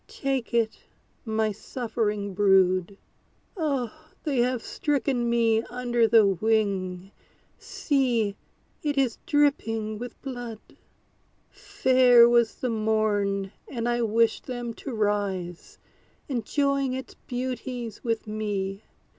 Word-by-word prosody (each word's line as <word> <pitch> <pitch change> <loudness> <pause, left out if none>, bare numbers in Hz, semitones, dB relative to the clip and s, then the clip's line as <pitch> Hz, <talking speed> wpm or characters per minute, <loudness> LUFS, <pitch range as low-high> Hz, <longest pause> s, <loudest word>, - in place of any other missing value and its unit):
Take 270 -3 -2
it, 230 -2 0 0.5
my 220 -1 0
suffering 210 -2 -3
brood. 190 -1 +3 0.6
Oh! 280 - -1 0.3
they 280 -5 0
have 245 -1 +1
stricken 265 -4 -1
me 230 -1 +3
under 240 -1 +1
the 225 -2 +6
wing; 195 -2 0 0.5
See, 240 -8 0 0.5
it 290 -2 -1
is 260 -4 +1
dripping 225 -7 +1
with 245 +1 -8
blood! 245 -5 -6 0.9
Fair 255 -12 +5
was 235 -1 +3
the 250 - -2
morn, 210 -3 0 0.2
and 235 -2 -3
I 240 0 +1
wished 230 0 +1
them 240 -2 -4
to 270 - -7
rise, 200 -5 -2 0.5
Enjoying 275 +2 0
its 260 0 -6
beauties 245 -2 -4
with 230 -2 -1
me. 205 -2 -3
230 Hz, 105 wpm, -26 LUFS, 210-255 Hz, 0.9 s, the